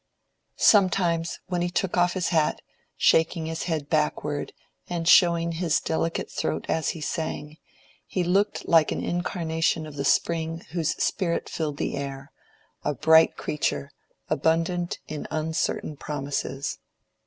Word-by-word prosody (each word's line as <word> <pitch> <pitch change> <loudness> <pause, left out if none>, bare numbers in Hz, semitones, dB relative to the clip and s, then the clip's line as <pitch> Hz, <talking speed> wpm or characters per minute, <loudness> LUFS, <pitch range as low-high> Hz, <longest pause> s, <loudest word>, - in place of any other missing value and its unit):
Sometimes, 180 -5 +3
when 180 -1 -2
he 175 - 0
took 180 0 -1
off 175 0 +3
his 185 -2 -1
hat, 160 -3 +2 0.4
shaking 160 0 +3
his 160 0 -3
head 160 -4 -2
backward, 150 -2 -1 0.4
and 170 -2 -2
showing 170 -2 +5
his 165 -1 +1
delicate 165 +1 -2
throat - - -2
as 160 - 0
he - - -9
sang, 155 -1 -4 0.5
he 185 - -1
looked 195 +4 +1
like 165 -2 +5
an - - -2
incarnation 165 -2 -1
of 150 -2 -10
the 140 - -1
spring 165 +3 +1
whose 170 -3 0
spirit 170 -4 -1
filled 150 -3 -3
the - - -2
air—a 140 +1 -7
bright 160 +5 +5
creature, 145 -1 -2 0.4
abundant 165 +3 0
in 155 -1 -5
uncertain 155 -1 -2
promises. 140 -1 -4
160 Hz, 130 wpm, -26 LUFS, 150-175 Hz, 0.5 s, showing